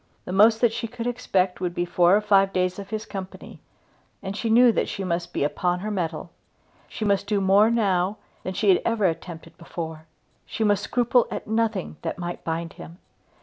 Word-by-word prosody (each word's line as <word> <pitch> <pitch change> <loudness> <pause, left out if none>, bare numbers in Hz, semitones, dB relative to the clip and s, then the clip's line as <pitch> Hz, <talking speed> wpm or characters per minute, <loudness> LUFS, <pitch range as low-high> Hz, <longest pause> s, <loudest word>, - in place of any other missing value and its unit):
The - - -6
most 220 +4 +5
that 235 -2 +3
she 230 0 -3
could 235 0 -7
expect 195 -7 0
would 175 -1 -2
be 175 - 0
four 175 +1 +4
or - - 0
five 195 -2 +3
days 185 +1 -1
of 200 0 -8
his 215 0 -4
company, 190 -2 -8 0.6
and 195 +1 -4
she 225 +2 -2
knew 240 +2 +6
that - - -1
she 195 - -4
must 175 -1 -2
be - - -1
upon 175 +5 -1
her 215 +2 -3
mettle. 180 -5 -3 0.6
She 215 - -5
must 200 -1 +1
do 205 -1 +1
more 195 +3 +4
now 200 -3 +1 0.2
than 185 - -5
she 205 - +1
had 185 - +5
ever 230 -3 0
attempted 165 -1 -4
before. 160 -2 -7 0.4
She 225 - -3
must 205 -2 +2
scruple 245 +2 +2
at - - -5
nothing 220 -7 -1
that - - -4
might 175 -1 -5
bind 165 0 -3
him. 170 - -11
195 Hz, 200 wpm, -24 LUFS, 175-220 Hz, 0.6 s, knew